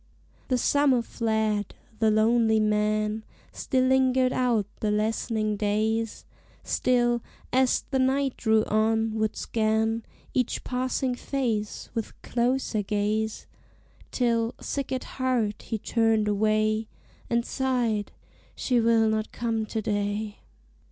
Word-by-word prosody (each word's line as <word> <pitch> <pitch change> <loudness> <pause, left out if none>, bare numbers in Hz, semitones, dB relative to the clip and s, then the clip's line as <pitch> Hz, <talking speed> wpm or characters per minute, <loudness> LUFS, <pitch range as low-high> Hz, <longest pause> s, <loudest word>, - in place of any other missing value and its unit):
The 255 - +1
summer 270 -1 +3
fled: 220 -3 -1 0.2
the 220 - +4
lonely 220 +1 +3
man 215 0 +1 0.3
Still 255 -1 0
lingered 260 -1 +3
out 240 -5 +1
the 215 - 0
lessening 215 0 0
days; 220 +2 -1 0.4
Still, 240 -1 +1 0.3
as 260 0 +3
the 265 - +1
night 265 +1 +1
drew 220 -1 +2
on, 220 +1 +1
would 220 -1 -1
scan 220 0 0 0.3
Each 250 -2 0
passing 255 0 -1
face 240 -5 -3
with 225 -3 -5
closer 245 -2 0
gaze 210 +2 -1 0.6
Till, 235 -1 0
sick 280 -2 -4
at 260 -1 -1
heart, 250 -5 -1
he 225 - -3
turned 225 0 +1
away, 215 +1 +1 0.4
And 235 0 +1
sighed 245 -6 0 0.4
"she 250 -2 +1
will 225 -1 +4
not 220 0 -1
come 225 -2 -2
to 220 0 -3
day." 205 +1 -2
225 Hz, 120 wpm, -26 LUFS, 215-250 Hz, 0.6 s, the